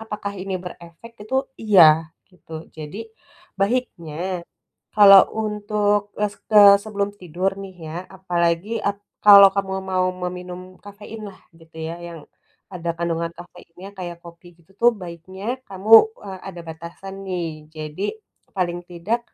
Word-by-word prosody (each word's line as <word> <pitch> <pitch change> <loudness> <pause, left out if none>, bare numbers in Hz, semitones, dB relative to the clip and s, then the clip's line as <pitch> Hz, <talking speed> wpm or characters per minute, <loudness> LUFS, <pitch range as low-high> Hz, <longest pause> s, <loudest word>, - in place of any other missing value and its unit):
apakah 210 -2 -5
ini 190 -1 -4
berefek, 175 +4 -11
itu, 265 +5 -1 0.2
iya, 165 -7 +6 0.2
gitu. 160 -2 -10
Jadi, 160 +8 -8 0.6
baiknya, 185 -6 -2 0.5
kalau 195 -2 +9 0.2
untuk 210 0 0 0.2
es 205 - -3
kes 205 -2 +8
sebelum 205 -1 -2
tidur 180 +3 -2
nih, 190 -2 -10
ya, 160 - -6 0.2
apalagi 175 +3 -1
ap 200 0 -2 0.3
kalau 200 -1 +10
kamu 195 -1 -2
mau 185 -1 0 0.2
meminum 180 0 -7 0.2
kafein 210 +2 -10
lah, 190 - -14 0.2
gitu 160 0 -19
ya, 160 +1 -5
yang 170 -1 -8 0.5
ada 170 -1 -3
kandungan 170 0 -2
kafeinnya, 175 +2 -13
kayak 175 -2 -6
kopi 170 +1 -14
gitu, 170 +3 -25
tuh, 240 +1 +6
baiknya, 190 +8 -6
kamu, 195 +3 -3 0.3
eee, 190 -1 -7
ada 175 -2 -8
batasan, 170 +4 -9
nih. 160 -4 -5
Jadi, 155 +6 -4 0.5
paling 175 -1 -1
tidak, 195 +8 -2
185 Hz, 135 wpm, -22 LUFS, 170-205 Hz, 0.6 s, kalau